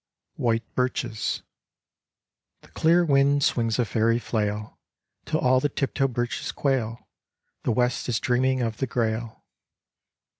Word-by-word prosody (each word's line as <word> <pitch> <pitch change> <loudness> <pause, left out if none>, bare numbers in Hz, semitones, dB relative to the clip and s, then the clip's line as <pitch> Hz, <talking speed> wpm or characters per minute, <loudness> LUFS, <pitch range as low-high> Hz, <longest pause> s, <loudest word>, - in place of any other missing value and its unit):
White 115 -1 0
Birches 120 -3 -1 1.2
The - - -19
clear 170 +2 +3
wind 140 -1 +3
swings 115 -4 +1
a 120 - +2
fairy 115 +2 +2
flail 105 -3 -3 0.5
Till - - 0
all 130 0 +4
the 145 - 0
tiptoe 135 0 0
birches 120 -1 -3
quail. 120 -5 -1 0.6
The - - +2
west 125 +2 0
is 115 - +1
dreaming 130 +1 +1
of 110 -2 -2
the 135 - -1
Grail. 115 -1 -2
120 Hz, 125 wpm, -25 LUFS, 115-130 Hz, 1.2 s, all